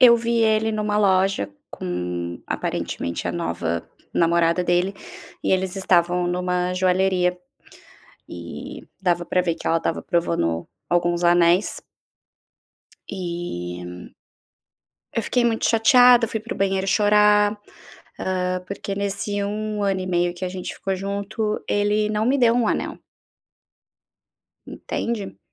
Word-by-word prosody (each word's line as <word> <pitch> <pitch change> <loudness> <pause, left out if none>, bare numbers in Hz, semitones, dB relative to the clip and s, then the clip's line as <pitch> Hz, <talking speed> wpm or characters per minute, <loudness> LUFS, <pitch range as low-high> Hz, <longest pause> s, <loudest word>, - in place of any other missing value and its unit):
eu 240 -2 +8
vi 235 0 0
ele 220 0 +2
numa 210 -1 -1
loja 190 - +2 0.2
com, 90 -1 -4
aparentemente, 85 +1 -3
a - - -2
nova 85 -1 -3 0.3
namorada 170 +1 +3
dele. 175 +3 +1 0.5
E - - +1
eles 190 0 0
estavam 180 -1 +2
numa 180 0 -1
joalheria 185 -1 +2 0.9
e 85 -1 -8 0.2
dava 175 -2 +1
pra 180 - +1
ver 170 -2 -1
que - - -9
ela 165 - +3
estava 165 - -2
provando 85 - 0 0.2
alguns 175 0 +1
anéis. 175 +2 +3 1.3
E 90 - -6 1.0
eu 230 - +1
fiquei 245 - +1
muito 225 -1 +1
chateada, 240 +1 +6
fui 220 - -3
pro 225 +2 -6
banheiro 195 0 0
chorar, 210 0 +4 0.6
hã, 185 -1 -1
porque 200 0 -5
nesse 200 0 -2
1 210 +1 -3
ano 195 -1 +1
e 185 - -4
meio 175 -1 +1
que 180 +1 -5
a - - -3
gente 185 0 -6
ficou 195 -1 -3
junto, 200 +3 -3
ele 210 +1 +1
não 215 +1 0
me 270 +3 +3
deu 235 -3 +4
um 240 -3 +2
anel. - - -2 1.7
Entende? 210 - -4
190 Hz, 125 wpm, -23 LUFS, 175-210 Hz, 1.7 s, eu